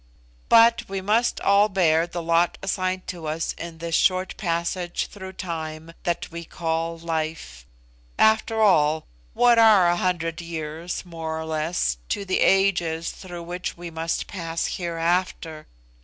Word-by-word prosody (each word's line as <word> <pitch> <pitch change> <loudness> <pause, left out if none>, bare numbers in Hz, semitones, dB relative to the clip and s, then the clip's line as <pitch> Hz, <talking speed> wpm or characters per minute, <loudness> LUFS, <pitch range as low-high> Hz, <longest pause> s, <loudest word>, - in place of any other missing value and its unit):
But 230 -1 +5
we 195 0 -3
must 220 +5 +1
all 200 +1 +4
bear 170 -4 +2
the 175 0 -5
lot 170 +1 +2
assigned 185 -1 -1
to 170 -3 -6
us 160 +1 -2
in 170 -1 -8
this 165 0 -5
short 185 +2 +2
passage 175 0 -2
through 190 -2 -9
time 160 -2 -6
that 175 -1 -2
we 170 0 -6
call 165 0 -3
life. 160 - -4 0.5
After 220 +1 +3
all, 160 -7 +3 0.3
what 240 -1 +5
are 215 -5 +7
a 175 - +2
hundred 170 -2 -1
years, 165 +1 -5
more 160 -2 -5
or 160 - -5
less, 155 - -1
to 200 - -2
the 185 - 0
ages 175 -4 +2
through 175 -2 -9
which 175 +1 -5
we 175 0 -7
must 165 0 -2
pass 165 -3 -3
hereafter? 170 -2 -2
170 Hz, 145 wpm, -24 LUFS, 165-185 Hz, 0.5 s, are